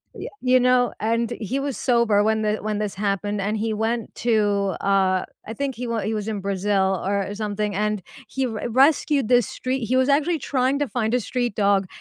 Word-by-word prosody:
Yeah, - - -6
you 255 0 +4
know, 250 0 +3
and 230 +2 0
he 245 +5 -2
was 275 -2 -3
sober 235 -5 +2
when 220 0 +1
th 215 0 -1
when 210 0 -2
this 210 -2 -3
happened, 205 0 -1
and 210 +2 -1
he 220 +1 -1
went 225 +1 -2
to, 205 -4 +2
uh, 190 -2 +2 0.2
I 225 - -6
think 275 +1 -3
he 245 +2 -5
wa 230 -1 -1
he 215 +3 -2
was 210 -1 -3
in 215 -2 -2
Brazil, 195 -1 0
or 200 +1 -1
something 210 -1 -2
and 210 0 -1 0.3
he 265 +3 -2
r 220 0 -4
rescued 275 +1 +3
this 245 -2 +4
street 255 0 -3
He 255 - +1
was 260 +2 +3
actually 310 +4 +2
trying 265 +1 0
to 290 - 0
find 230 -2 -1
a 250 - +3
street 245 -1 -2
dog 200 -2 +2
220 Hz, 210 wpm, -23 LUFS, 205-250 Hz, 0.3 s, you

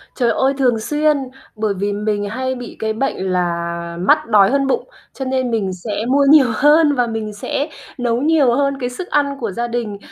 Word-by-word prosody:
Trời 245 -3 +1
ơi, 265 +1 +1
thường 245 -4 +2
xuyên! 300 +5 +1 0.4
Bởi 215 -2 -1
vì 200 +2 -2
mình 205 0 -2
hay 260 +4 -3
bị 245 -1 -8
cái 220 0 -1
bệnh 270 +5 -2
là 170 -1 -2
mắt 185 - +3
đói 210 -2 +5
hơn 275 0 +1
bụng, 480 - -1 0.2
cho 265 - -5
nên 260 -1 -1
mình 200 -5 -1
sẽ 205 +4 -4
mua 280 +2 +3
nhiều 295 -4 +7
hơn 295 +2 +4
và 245 -2 +1
mình 220 -2 -4
sẽ 275 +8 -3 0.3
nấu 240 -2 0
nhiều 295 -5 +3
hơn 275 0 0
cái 245 -2 -2
sức 355 +9 -7
ăn 280 -1 0
của 225 -5 -3
gia 235 +5 -3
đình, 230 -4 -3
240 Hz, 210 wpm, -18 LUFS, 210-275 Hz, 0.4 s, nhiều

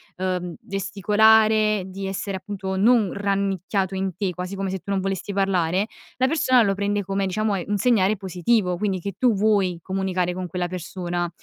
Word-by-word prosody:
ehm, 180 -2 -3
gesticolare, 215 +2 +3
di 195 +1 -6
essere 195 0 -3
appunto 190 0 -5
non 220 -1 +4
rannicchiato 195 -1 -1
in 190 -2 -2
te, 190 0 -1
quasi 180 +2 -5
come 195 0 -2
se 190 - -2
tu 200 - -7
non 195 -1 +1
volessi 195 +1 -3
parlare, 190 0 +1 0.3
la 260 - +2
persona 255 -5 +3
lo 195 -2 +2
prende 205 +1 -1
come 195 +1 -1
diciamo 210 +2 0
è 180 - -3
un 205 - 0
segnale 210 -2 +3
positivo, 185 0 0
quindi 190 -2 -1
che 200 0 -5
tu 250 -2 +4
vuoi 200 -3 +2
comunicare 185 -1 -1
con 185 0 -4
quella 175 +1 -3
persona. 175 -1 -3
195 Hz, 180 wpm, -23 LUFS, 185-205 Hz, 0.3 s, non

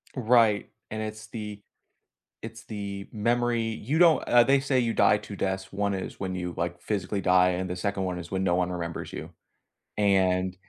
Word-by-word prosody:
Right. 115 -4 +3 0.2
And 110 0 -4
it's 110 0 -6
the 105 -2 -7 0.8
it's 115 0 -9
the 100 -2 -6
memory. 120 +2 +1
You 115 +7 -2
don't 170 -3 +5
eh, 120 -1 +6
they 135 +1 +4
say 135 -1 +1
you 115 -2 0
die - - +4
2 - - -9
deaths, 95 0 -3
1 100 0 0
is 95 - -5
when 95 -1 -3
you, 90 -1 -4
like, 85 0 -3
physically 100 -1 -2
die, 90 0 +4
and 90 0 -2
the 90 - -3
2nd 100 +1 -2
one 90 -1 -2
is 85 0 -8
when 95 0 -1
no 90 -2 +2
one 90 0 0
remembers 85 -2 -5
you. - - -6 0.7
And 95 -2 +2
100 Hz, 190 wpm, -27 LUFS, 90-115 Hz, 0.8 s, eh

